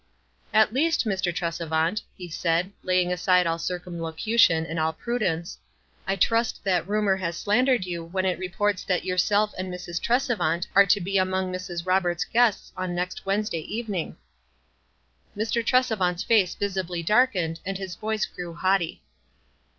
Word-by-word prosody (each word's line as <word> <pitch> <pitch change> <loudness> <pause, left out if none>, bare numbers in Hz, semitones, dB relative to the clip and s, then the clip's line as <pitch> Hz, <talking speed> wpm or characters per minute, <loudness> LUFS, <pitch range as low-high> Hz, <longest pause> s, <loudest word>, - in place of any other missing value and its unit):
"At 220 0 +4
leaM, 300 +6 +3
Mr. 195 - 0
Tresevant," 165 +2 -1 0.2
he 180 - -7
said, 170 +3 0
laying 180 -1 +1
aside 180 0 +3
all 165 0 0
otrcamlocution 170 +1 +1
and 165 +1 -3
all 160 0 +1
prudence, 180 -6 -2 0.2
" - - -35
I 195 - +1
trust 230 +4 +1
that 185 -2 0
rumor 205 -2 +2
has 170 -3 -3
slandered 245 0 +2
you 170 -2 -4
when 185 +3 -2
it 185 -1 0
re 185 -1 -4
ports 205 +1 0
that 180 -2 0
yourself 205 +3 +2
aud 185 - -3
Mrs. 180 -1 -5
Tresevant 240 -8 +1
are 200 0 +6
to 205 +2 +4
be 195 +1 0
among 185 0 0
Mrs. 180 -2 -5
Roberts' 185 -1 +1
guests 230 0 +1
on 185 -1 -3
next 180 +2 -4
Wednesday 195 -4 0
evening." 205 -2 -4 1.2
Mr. 225 +2 0
Tresevant's 215 -7 +1
race 200 -6 +3
visibly 185 -4 -2
darkened, 185 -6 +2
and 195 0 -3
his 190 -2 -6
voice 215 +4 -2
grew 175 -2 -8
haughtv. 185 -3 +1
185 Hz, 155 wpm, -25 LUFS, 175-210 Hz, 1.2 s, are